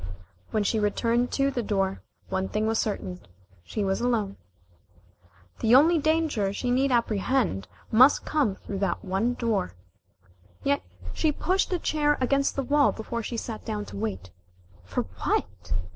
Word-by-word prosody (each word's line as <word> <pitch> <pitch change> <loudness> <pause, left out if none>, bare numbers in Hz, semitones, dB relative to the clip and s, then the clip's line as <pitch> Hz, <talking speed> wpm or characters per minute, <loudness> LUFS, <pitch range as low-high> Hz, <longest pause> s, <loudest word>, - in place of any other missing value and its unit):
When 215 - 0
she 220 +2 +1
returned 230 +4 +1
to 275 0 +2
the 250 - -1
door, 195 -3 -1 0.3
one 190 0 -1
thing 215 +1 0
was 225 0 +1
certain, 185 -4 -2 0.4
she 210 - -3
was 195 +2 0
alone. 220 -5 0 1.2
The 230 +2 +5
only 320 +5 +6
danger 310 -10 +1
she 245 +4 -2
need 265 +2 +2
apprehend 225 - +1 0.2
must 255 +6 +6
come 280 -11 +1
through 195 0 -6
that 195 +1 -1
one 200 +6 0
door. 215 - -1 0.9
Yet 140 +4 +2 0.3
she 310 - +2
pushed 370 +7 0
a 360 - +2
chair 295 -3 +1
against 275 +2 +1
the 275 - -1
wall 290 +2 +4
before 235 +1 -4
she 235 +1 -4
sat 225 -1 -5
down 105 -1 -3
to 100 0 -10
wait 95 -3 -4 0.5
for 90 0 -2 0.2
what? 90 0 -1
225 Hz, 155 wpm, -27 LUFS, 195-270 Hz, 1.2 s, only